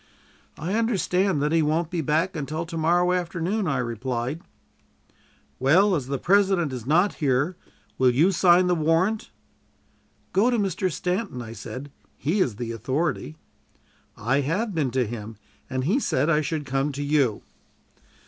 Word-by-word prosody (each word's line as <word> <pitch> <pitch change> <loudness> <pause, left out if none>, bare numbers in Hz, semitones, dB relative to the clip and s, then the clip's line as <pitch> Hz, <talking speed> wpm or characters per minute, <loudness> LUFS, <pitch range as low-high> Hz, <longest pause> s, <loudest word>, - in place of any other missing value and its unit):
"I 170 +6 -3
understand 195 -7 +1
that 150 - +1
he 165 0 +3
won't 155 +2 0
be 175 -2 -1
back 160 +6 0
until 155 +2 -3
to 165 0 -8
morrow 175 +3 +2
afternoon," 180 +3 -1
I 140 -3 0
replied. 125 +4 -3 1.2
"Well, 185 +10 +4
as 140 -7 -1
the 140 0 -2
President 190 -3 +2
is 125 -2 -6
not 175 +7 +3
here, 140 +5 +1 0.4
will 130 -1 +5
you 150 +10 +3
sign 180 0 +5
the 180 - +2
warrant?" 165 +7 +1 1.0
"Go 210 +6 +4
to 245 - +1
Mr. 190 -2 0
Stanton," 180 - -2
I 115 -2 -7
said; 130 +5 -8 0.3
"he 165 +9 0
is 125 - +1
the 115 +1 -4
authority." 140 - -2 0.8
"I 120 +6 +1
have 190 - -1
been 155 -6 0
to 125 0 0
him, 110 -1 -7 0.3
and 130 0 -2
he 195 - +2
said 150 - +1
I 155 -1 +3
should 155 0 -3
come 135 +2 -1
to 145 +2 -4
you." 140 -7 +1
155 Hz, 160 wpm, -25 LUFS, 130-180 Hz, 1.2 s, will